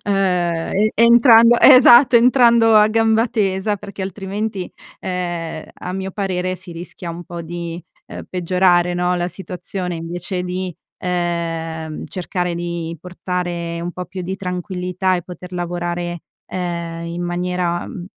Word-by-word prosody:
ehm, 180 -4 0
e 215 +2 +2
entrando 235 0 +7
esatto, 250 -1 +8
entrando 235 -2 +5
a 210 0 +6
gamba 225 +1 +2
tesa 200 -1 0
perché 200 0 -8
altrimenti, 195 +1 -4 0.3
ehm, 175 -3 -4
a 180 - -7
mio 190 0 -4
parere 185 -2 -2
si 180 -2 -11
rischia 170 0 -8
un 170 +1 -7
po' 170 0 -8
di, 170 +1 -6 0.3
uhm, - - -8
peggiorare 180 0 +2
no 180 0 +1
la 175 0 -1
situazione 180 -1 -5
invece 175 +2 -4
di, 180 -1 -4 0.2
ehm, 165 -3 -3
cercare 180 -1 -3
di 170 -1 -4
portare 175 -1 -4
un 175 +1 -4
po' 180 - -5
più 185 +2 -8
di 190 +2 -3
tranquillità 180 0 -2
e 175 - -2
poter 180 +1 -10
lavorare, 175 -1 -3 0.2
ehm, 170 -2 -4
in 170 +1 -4
maniera, 175 0 -2
mhmm, 185 -8 -7
180 Hz, 140 wpm, -19 LUFS, 175-195 Hz, 0.3 s, esatto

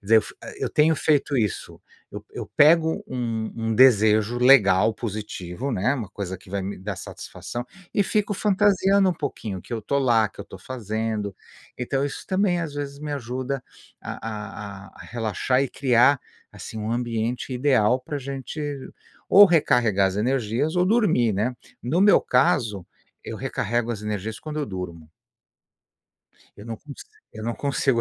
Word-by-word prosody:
dizer, 110 +2 +5
eu - - +7
f - - -11
a - - -9
eu - - -1
tenho 155 +2 +4
feito 145 -1 +1
isso. 105 -5 -2 0.3
Eu - - -7
eu - - -6
pego 160 +2 +5
um 115 -3 -3
um 115 -1 -1
desejo 110 -2 +5
legal, 115 -5 +5
positivo, 105 +1 -5
né, 115 +9 +1
uma 110 -8 -5
coisa 95 -2 -5
que 95 +1 -17
vai 100 0 -2
me 100 +1 -5
dar 100 +1 -4
satisfação, 120 +6 -7 0.3
e 205 - +4
fico 205 +1 0
fantasiando 200 -1 +3
um 180 - 0
pouquinho 105 - -5
que - - -11
eu 115 - -1
estou 140 +6 -1
lá, 115 -5 +3
que - - -25
eu - - -4
estou 95 - -12
fazendo. 110 -3 -3 0.4
Então 135 +3 -1
isso 145 - -6
também 185 -2 +1
às 155 -3 -5
vezes 140 -1 -5
me 150 0 -5
ajuda 130 0 -3 0.4
a - - -6
a 105 -2 -7
a - - -17
a - - -10
relaxar 120 +3 0
e 135 - -1
criar, 130 +1 +4 0.3
assim, 110 - -8
um 110 +2 -2
ambiente 120 +1 -2
ideal 125 -3 +3
para 145 +3 -6
a - - -3
gente 135 +3 -5 0.7
ou 205 +1 +9
recarregar 120 - +3
as 95 - -5
energias, 125 +6 0
ou 180 - +4
dormir, 195 - +3
né. 110 +6 -1 0.3
No 150 +9 0
meu 205 - +6
caso, 115 -7 +1 0.4
eu - - -6
recarrego 120 +2 -1
as 105 -2 -4
energias 105 0 -4
quando 155 -1 -6
eu 145 - -2
durmo. 85 -4 -7 1.5
Eu 100 - -11
não 115 - -5
cons 150 -2 -11 0.3
eu 110 - -8
não 120 0 -2
consigo 135 -3 0
120 Hz, 175 wpm, -24 LUFS, 105-140 Hz, 1.5 s, ou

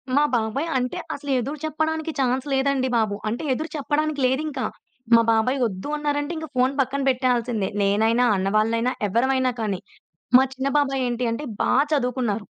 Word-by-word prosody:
మా 290 - +5
బాబాయ్ 235 +8 -1
అంటే 250 +7 -2 0.2
అసలు 285 0 -5
ఎదురు 280 +6 -4
చెప్పడానికి 315 +1 -1
ఛాన్స్ 260 +1 +1
లేదండి 265 -1 +1
బాబు. 215 -3 +1
అంటే 240 +8 -3
ఎదురు 315 +5 -4
చెప్పడానికి 295 +1 -1
లేదింకా. 270 0 -1 0.5
మా 230 - +6
బాబాయ్ 225 +5 +2
వద్దు 195 +6 -4
అన్నారంటే 290 +2 -1
ఇంక 315 - -5
ఫోన్ 255 +2 +2
పక్కన 275 +2 -2
పెట్టేయాల్సిందే. 245 -5 0
నేనైనా, 220 +5 +3
అన్నవాళ్ళైనా, 220 +5 +1 0.2
ఎవరమైనా 260 +3 +2
కానీ. 200 -4 -1 0.6
మా 265 - +5
చిన్న 265 +1 -1
బాబాయ్ 270 -2 +1
ఏంటి 240 +1 -2
అంటే 230 - -4 0.2
బా - - +1 0.2
చదువుకున్నారు. 245 -6 0
255 Hz, 150 wpm, -23 LUFS, 230-285 Hz, 0.6 s, మా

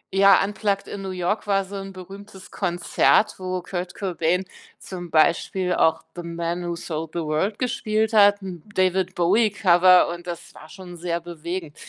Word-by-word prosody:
Ja, 195 0 +6
„Unplugged 200 -1 -2
in 200 - -6
New 195 - -5
York” 185 +3 -2
war 195 -1 +1
so 200 +2 -9
'n 195 0 -7
berühmtes 195 +1 -12
Konzert, 180 +3 +2
wo 185 -1 -4
Kurt 180 -1 -5
Cobain 180 -1 -1 0.3
zum 175 -2 -8
Beispiel 175 +3 +2
auch 160 -1 +2
„The 175 - -5
Man 170 +1 -4
who 170 - -2
sold 160 -2 -6
the 170 - -2
World“ 160 +7 -1
gespielt 220 -3 -1
hat, 205 -1 +5
'n 180 -4 -7
David-Bowie-Cover, 185 0 +3
und 175 +1 -7
das 170 -1 -7
war 155 - -14
schon 180 0 -11
sehr 170 0 -2
bewegend. 170 -1 -6
180 Hz, 160 wpm, -23 LUFS, 170-195 Hz, 0.3 s, Ja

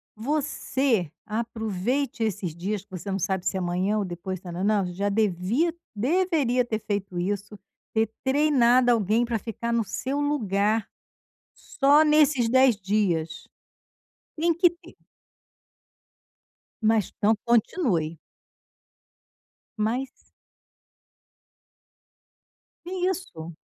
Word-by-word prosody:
você 265 - -1
aproveite 225 +3 -2
esses 195 -6 -2
dias 195 +3 -3
que - - -40
você 185 +2 -6
não 195 - -1
sabe 190 0 -1
se 190 - 0
amanhã 185 +3 0
ou 205 - -1
depois, 180 +1 -5
ta 180 -2 -9
nã 175 +2 -4
nã. 205 -2 +2
Já 200 +3 -1
devia 215 - +1 0.2
deveria 275 - +1
ter 220 -2 -2
feito 200 -3 -3
isso: 205 +3 -3 0.4
ter 220 -1 +1
treinado 260 -3 +4
alguém 225 +1 +2
para 235 -2 -2
ficar 235 +2 -4
no 230 -1 +2
seu 265 +7 -3
lugar 220 -7 0 0.7
só 290 +2 +3
nesses 300 -6 +4
10 260 -1 +5
dias. 180 -5 -1 0.9
Tem 335 +2 +2
que 345 +2 +4
ter. 345 0 -17 1.9
Mas 220 -3 +2
então, 215 +2 +3
continue. 220 - +1 1.6
Mas. 250 +6 -2 2.6
Que 350 - -8 0.2
isso! 170 - -6
220 Hz, 105 wpm, -25 LUFS, 195-265 Hz, 2.6 s, 10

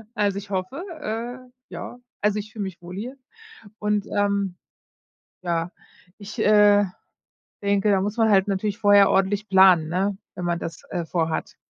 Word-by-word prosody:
Also, 205 -2 +1
ich 200 0 -12
hoffe, 195 - -3 0.2
äh, 245 +1 -5 0.2
ja. 245 - -8 0.2
Also, 210 0 +1
ich 210 +1 -8
fühle 215 -2 -5
mich 190 -3 -7
wohl 175 +1 -9
hier 240 +7 -6 0.6
und, 210 -1 0
ähm 200 -2 0 0.9
ja. 170 0 -2 0.5
Ich, 205 0 -10
äh, 205 -1 +5 0.8
denke, 200 0 +1
da 195 -1 +3
muss 205 +3 -3
man 225 -1 +3
halt 195 -1 +4
natürlich 200 +1 -1
vorher 205 -2 +6
ordentlich 195 +2 +1
planen, 190 -4 +6
ne, 190 +3 -1 0.2
wenn 180 - -5
man 170 0 0
das, 165 -1 -7
äh, 175 -2 -3
vorhat. 160 -1 -2
200 Hz, 160 wpm, -24 LUFS, 185-210 Hz, 0.9 s, vorher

